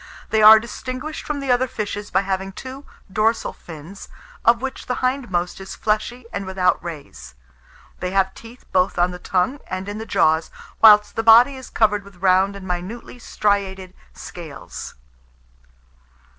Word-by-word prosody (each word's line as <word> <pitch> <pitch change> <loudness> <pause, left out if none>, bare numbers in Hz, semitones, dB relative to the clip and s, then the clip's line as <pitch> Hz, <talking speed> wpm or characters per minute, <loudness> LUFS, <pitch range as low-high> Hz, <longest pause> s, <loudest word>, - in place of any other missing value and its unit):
They 220 - +3
are 215 +1 +10
distinguished 255 +6 -6
from 290 -2 -3
the 270 -2 -1
other 250 +1 +2
fishes 205 -2 -5
by 190 - +2
having 190 0 -3
two 265 +6 -9 0.3
dorsal 220 +3 +1
fins, 165 +4 -11 0.3
of 235 0 +4
which 265 +1 -6
the 250 - -1
hindmost 220 -10 -2
is 195 - -8
fleshy 220 +3 -2
and 195 - -4
without 190 -2 +1
rays. 140 - -9 0.6
They 180 - -2
have 190 0 +1
teeth 230 +2 -14
both 185 0 +1
on 175 +1 +2
the 180 - -8
tongue 190 +11 0
and 185 +1 -5
in 205 +1 -5
the 220 - -7
jaws, 160 +1 +2 0.3
whilst 210 -1 +7
the 225 - 0
body 230 +4 +7
is 260 -1 -10
covered 210 -2 +1
with 200 -1 -16
round 190 +2 +2
and 195 -1 -9
minutely 185 +8 -5
striated 195 -4 -1 0.2
scales. 160 -5 -9
200 Hz, 155 wpm, -21 LUFS, 185-235 Hz, 0.6 s, are